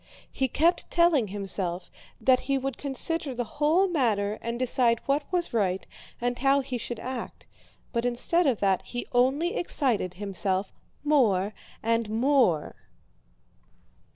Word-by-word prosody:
He 265 - 0
kept 335 +7 +1
telling 340 -9 +3
himself 190 -3 -3 0.3
that 255 -1 +4
he 275 - +3
would 270 -1 -3
consider 285 0 -2
the 245 - -1
whole 305 - +2
matter 215 - 0
and 235 +1 -3
decide 245 -2 +2
what 285 +3 -1
was 355 -6 -1
right 190 -4 0 0.3
and 245 0 -2
how 275 +2 +3
he 260 -2 -4
should 235 +1 -5
act, 255 -1 -6 0.5
but 235 -1 0
instead 250 +8 +2
of 250 -6 +1
that 195 -2 +2
he 245 0 -6
only 265 +8 +2
excited 235 - 0
himself 195 0 -2 0.3
more 215 -10 +2 0.3
and 230 -1 +1
more. 230 - +2
245 Hz, 135 wpm, -27 LUFS, 210-280 Hz, 0.5 s, that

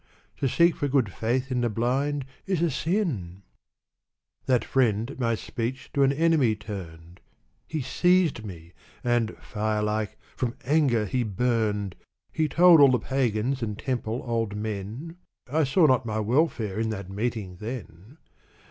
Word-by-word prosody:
To 135 - 0
seek 170 +6 +4
for 145 - 0
good 130 -8 +1
faith 125 +4 -1
in 125 -1 +1
the 120 - +1
blind 130 +5 0 0.2
is 190 -4 0
a 170 - +2
sin! 130 - -2 0.5
" - - -51
That 125 -4 +2
friend 115 -2 +1
at 140 - -11
my 115 -2 +1
speech 125 +3 -5
to 140 - +1
an 135 0 +5
enemy 150 -6 +3
turned; 90 -5 -9 0.5
He 155 -4 -3
seized 180 +4 +3
trie, 85 -4 -10 0.3
and, 120 -2 0
fire 105 0 -2
like, 105 -1 -2 0.2
from 125 -2 -2
anger 135 -6 +3
he 125 +4 -1
burned. 105 -3 0 0.4
He 155 -1 +1
told 170 +1 +7
all 140 - +8
the 130 - +3
pagans 130 0 -1
and 105 -3 -3
temple 120 -2 -3
old 115 -3 -1
men; 110 - -5 0.3
I 150 +4 +1
saw 155 +6 +4
not 130 -3 +4
my 110 0 -1
welfare 110 - 0
in 110 0 0
that 100 -3 -5
meeting 105 -3 -3
then. 110 - -8
120 Hz, 155 wpm, -26 LUFS, 105-140 Hz, 0.5 s, all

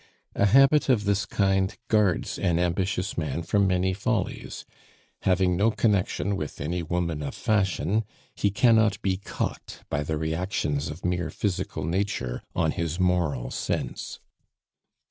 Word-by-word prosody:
A 100 - +3
habit 135 +7 +5
of 120 -5 +3
this 100 -1 0
kind 95 -1 +1
guards 105 -5 +1
an 85 -3 +1
ambitious 90 +2 -1
man 80 +1 -2
from 100 +3 +2
many 90 0 +1
follies; 95 - -3 0.6
having 90 -1 +2
no 105 +5 +3
connection 100 -2 +1
with 75 -6 -5
any 85 +5 -2
woman 85 -2 -2
of 70 - -4
fashion, 100 -1 +1 0.3
he 100 - +1
cannot 110 -1 +4
be 95 -2 +1
caught 100 - -5
by 70 - 0
the 75 +1 -2
reactions 80 -2 -1
of 75 +4 -7
mere 90 -2 0
physical 95 -6 -2
nature 85 - -2
on 80 -2 +2
his 85 +1 -3
moral 85 -9 +1
sense. - - -3
90 Hz, 140 wpm, -26 LUFS, 80-100 Hz, 0.6 s, habit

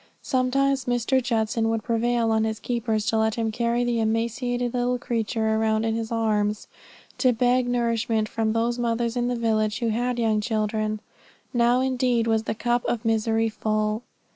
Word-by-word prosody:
Sometimes 270 +1 +1
Mr. 245 +2 +1
Judson 225 -2 0
would 225 -1 -1
prevail 230 0 +1
on 220 0 +2
his 220 0 -2
keepers 230 -3 -1
to 225 -1 +1
let 220 0 +1
him 225 -1 -1
carry 235 +2 0
the 240 -1 0
emaciated 235 +2 -1
little 250 0 0
creature 225 -2 -1
around 220 0 +1
in 225 - 0
his 225 0 -3
arms, 210 -2 0 0.5
to 255 - +4
beg 245 +1 +2
nourishment 230 -2 0
from 220 0 -1
those 235 +1 0
mothers 235 0 0
in 245 0 0
the 245 - 0
village 215 -2 0
who 235 - -1
had 245 +2 -1
young 220 -2 +1
children. 215 -1 -1 0.5
Now 240 +1 +3
indeed 250 -3 +1
was 225 -1 +1
the - - -2
cup 240 +2 0
of 235 -1 -2
misery 225 0 +1
full. 215 0 -1
230 Hz, 170 wpm, -25 LUFS, 220-245 Hz, 0.5 s, to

